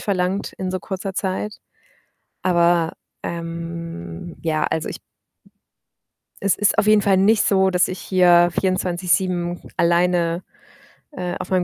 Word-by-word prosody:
verlangt 190 0 -1
in 185 -1 -4
so 185 - -2
kurzer 190 +1 -5
Zeit. 195 +2 -3 0.9
Aber, 170 -2 +3 0.3
ähm 165 - -6
ja, 155 -2 0
also, 160 -1 -1
ich - - -6 1.4
Es 200 - +2
ist 205 0 +2
auf 210 - +3
jeden 215 -1 +6
Fall 195 -2 +3
nicht 210 +3 +4
so, 190 -1 +3
dass 180 -1 +2
ich 185 - -5
hier 175 -2 +4
24/7 180 -1 0 0.2
alleine, 170 0 +2 0.7
äh, 180 -10 -4
auf - - -6
meinem 185 -1 +3
180 Hz, 130 wpm, -21 LUFS, 170-190 Hz, 1.4 s, jeden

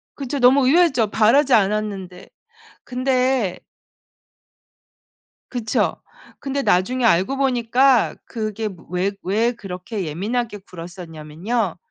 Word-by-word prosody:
그쵸. 280 0 -4
너무 260 +1 +5
의외죠. 265 - +3
바라지 240 +6 +4
않았는데 200 -3 -1 0.6
근데 255 -4 0 1.9
그쵸. 235 -4 -1 0.4
근데 275 0 -3
나중에 240 +7 +1
알고 205 +5 +3
보니까 255 -1 +3
그게 215 -1 -3
무 180 -4 -13
왜 185 +3 0
왜 220 +6 +1
그렇게 195 -1 -6
예민하게 210 +8 -3
굴었었냐면요. 175 +3 -4
225 Hz, 230 characters per minute, -21 LUFS, 190-255 Hz, 1.9 s, 너무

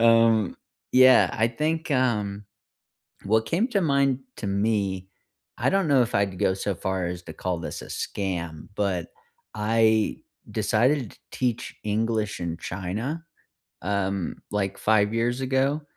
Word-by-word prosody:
Um, 115 -3 +4 0.4
yeah, 130 0 +7
I 115 +1 +2
think, 155 +4 -2
um, 105 -6 0 0.8
what 110 +3 +2
came 190 +8 +1
to 210 -5 +1
mind 140 -5 +2 0.2
to 105 - -5
me, 100 -2 0 0.5
I - - +1
don't 195 -3 +2
know 135 -3 +5
if 120 - -3
I'd 100 -2 +1
go 95 - +2
so 100 +1 -2
far 95 0 -2
as 90 0 -5
to 80 - -8
call 90 +2 -3
this 85 - -6
a - - -9
scam, 85 -5 -4
but 95 -5 -1 0.5
I 110 0 +2 0.3
decided 125 +2 +1
to - - -20
teach 125 -3 -2
English 110 -1 -1
in 85 -1 -3
China, 105 - -4 0.6
um, 95 -1 -1
like, 100 -2 -1
5 105 -1 +3
years 120 +3 0
ago, 135 +3 +1
110 Hz, 145 wpm, -25 LUFS, 95-130 Hz, 0.8 s, yeah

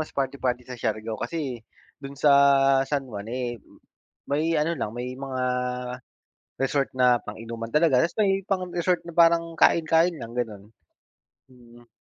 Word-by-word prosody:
mas 155 - -3
party-party 130 -2 -1
sa 125 -1 -9
Siargao 110 -1 -3
kasi, 130 -1 -4 0.4
do'n 140 0 -9
sa 145 +1 +4 0.6
San 145 -2 -1
Juan, 105 -4 -8
eh, 120 -1 -4 0.7
may 155 +3 +1
ano 165 +3 0
lang 110 -5 -3
may 125 +1 -4
mga 130 -1 -4 1.2
resort 135 +1 +1
na 125 -1 +4
pang-inuman 115 +1 -7
talaga, 150 -5 +4
tas 170 - -1
may 195 -2 +2
pang 185 -2 -2
resort 175 +1 0
na 170 - -8
parang 165 -1 +3
kain-kain 165 +2 +3
lang 115 +1 -8
gano'n. 110 -5 -3 0.9
Mm. 120 -1 -18
130 Hz, 145 wpm, -25 LUFS, 120-165 Hz, 1.2 s, sa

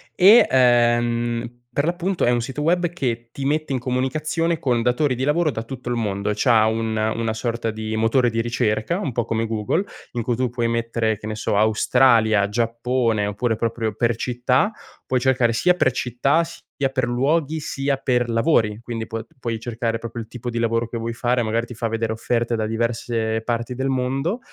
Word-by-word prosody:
e, 200 +5 +7
ehm, 120 -1 +2
per 145 +4 0
l'appunto 175 +2 0
è 120 - +3
un 120 -1 +1
sito 135 +4 -4
web 175 +2 +2
che 120 -8 -3
ti 135 - -5
mette 155 0 0
in - - +1
comunicazione 150 +7 -1
con 120 -5 0
datori 125 +4 +1
di 125 +1 -3
lavoro 155 +2 +2
da 110 - -4
tutto 125 +1 -7
il 120 - 0
mondo, 105 -2 -1
c'ha 115 -2 +4
un 110 0 -1
una 110 +1 0
sorta 115 0 -2
di 110 0 -4
motore 115 +2 +2
di 115 0 0
ricerca, 120 - 0
un 150 -10 -3
po' 120 0 -1
come 115 0 -1
Google 110 - -1 0.3
in 120 -2 -2
cui 120 0 0
tu 125 0 0
puoi 120 -1 -1
mettere, 115 -2 -1
che 105 - -7
ne 110 - -3
so 105 - -1
Australia, 110 -1 +3
Giappone, 115 -1 0
oppure 110 +3 -1
proprio 115 -1 -2
per 115 0 +1
città, 125 - +1 0.3
puoi 130 -1 +1
cercare 125 -2 +2
sia 180 +9 +3
per 130 -7 +2
città, 125 +7 +1
sia 140 -4 -4
per 130 -2 0
luoghi, 150 +5 0
sia 140 -1 -1
per 125 -2 0
lavori, 115 -3 +2
quindi 115 -2 -5
puo 115 0 -5
d 115 - -16
puoi 115 -3 -3
cercare 115 -1 -2
proprio 115 +1 -6
il 110 - -9
tipo 120 +1 -6
di 115 - -4
lavoro 115 0 0
che 115 - -5
vuoi 115 +1 -3
fare, 120 +1 0
magari 115 +2 -1
ti 125 - -9
fa 115 +1 -2
vedere 115 0 -2
offerte 115 +1 -1
da 110 - -1
diverse 115 0 -1
parti 120 +1 -2
del 130 +2 -1
mondo 135 - -1
120 Hz, 200 wpm, -22 LUFS, 115-130 Hz, 0.3 s, e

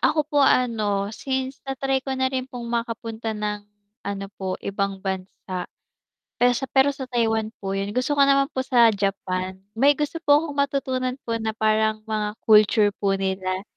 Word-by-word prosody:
Ako 305 -2 +2
po 290 -1 +1
ano, 215 -6 +2
since 265 +2 -3
na-try 270 0 0
ko 265 0 -4
na 260 0 +1
rin 260 0 -2
pong 245 -2 -7
makapunta 230 -2 -3
ng 210 0 -2 0.5
ano 200 -1 -3
po 190 -1 -2
ibang 195 -1 -2
bansa, 185 -1 -4 0.7
pero 245 0 +6
sa 270 - -3
pero 265 +1 +4
sa 275 -1 -6
Taiwan 225 -3 0
po 195 0 -3
'yon, 200 +1 -2
gusto 255 +5 0
ko 280 - +5
naman 275 0 +3
po 260 - -2
sa 245 -3 +5
Japan. 190 -2 -2 0.2
May 275 +5 +6
gusto 300 +2 -2
po 290 -1 +6
akong 300 -3 -6
matutunan 260 -2 0
po 230 - 0
na 220 -1 -2
parang 220 0 +1
mga 215 -1 -1
culture 210 -1 +5
po 200 -1 0
nila. 190 -1 -2
225 Hz, 175 wpm, -24 LUFS, 200-265 Hz, 0.7 s, pero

